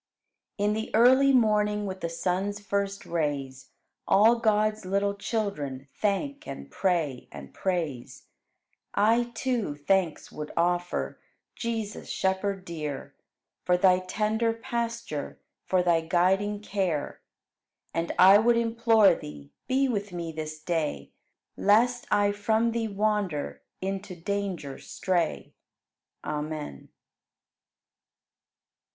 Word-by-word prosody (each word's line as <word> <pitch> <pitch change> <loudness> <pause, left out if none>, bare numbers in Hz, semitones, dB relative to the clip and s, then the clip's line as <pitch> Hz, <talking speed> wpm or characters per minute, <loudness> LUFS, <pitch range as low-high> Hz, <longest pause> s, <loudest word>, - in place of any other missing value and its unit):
7. 205 +1 +2
In - - +1
the 220 +1 -3
early 260 +4 +6
morning, 210 -4 +3
With 190 -1 -5
the 170 - -2
sun's 190 +4 -1
first 200 -1 -2
rays. 140 -5 -3 0.4
All 225 +4 +5
God's 215 -1 +2
little 200 +2 0
children 175 - -3
Thank 245 +8 -2
and 70 0 -8
pray 165 -9 -1
and 70 -2 -10
praise. 165 -10 -3 0.7
I, 230 +3 +4
too, 235 - -1
thanks 170 +3 0
would 150 0 -6
offer, 175 +1 0 0.4
Jesus, 225 -3 -4
Shepherd 190 0 -1
dear, 150 -5 -5 0.5
For 180 0 +3
Thy 185 0 +5
tender 215 +4 0
pasture, 235 - -4 0.3
For 185 -1 +2
Thy 170 -2 +3
guiding 190 +5 +1
care. 190 -8 -2 0.7
And 165 +1 -1
I 195 +2 +8
would 235 +2 +4
implore 230 -4 +4
Thee, 75 - -9 0.2
Be 270 +1 +2
with 205 -5 -2
me 170 -2 -4
this 155 -1 -6
day, 160 -2 -2 0.4
Lest 240 +4 +3
I 205 0 +3
from 220 +3 +1
Thee 230 -1 -1
wander, 205 -6 -1 0.2
Into 195 0 -4
danger 180 -5 -3
stray. 175 -3 -2 0.7
Amen. 150 - -5
195 Hz, 110 wpm, -27 LUFS, 165-215 Hz, 0.7 s, I